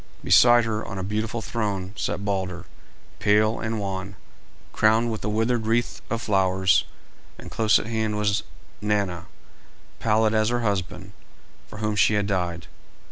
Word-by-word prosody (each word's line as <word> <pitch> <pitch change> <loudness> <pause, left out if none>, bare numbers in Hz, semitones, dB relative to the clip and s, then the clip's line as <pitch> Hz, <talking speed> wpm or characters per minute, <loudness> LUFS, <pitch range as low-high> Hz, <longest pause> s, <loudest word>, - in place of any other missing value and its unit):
Beside 120 +6 +6
her, 110 -1 -2
on 100 - -7
a 95 - -3
beautiful 110 +3 -3
throne, 100 -4 -3
sat 100 - -3
Balder, 95 -3 -3 0.5
pale 105 +2 +3
and 110 -1 -3
wan, 95 0 -4 0.6
crowned 110 +2 +3
with 110 - -5
a 105 - -1
withered 115 +1 0
wreath 115 +1 0
of 115 +1 -3
flowers, 95 -2 +2 0.5
and - - -11
close 110 -1 +3
at - - -4
hand 110 -2 -2
was 105 0 +1 0.4
Nanna, 100 -5 -1 0.7
pallid 110 0 +2
as 110 0 +2
her 120 0 0
husband, 95 -2 -3 0.6
for - - -11
whom 105 0 -1
she 105 0 +3
had 105 -1 +1
died. 90 -4 -2
105 Hz, 150 wpm, -24 LUFS, 95-110 Hz, 0.7 s, Beside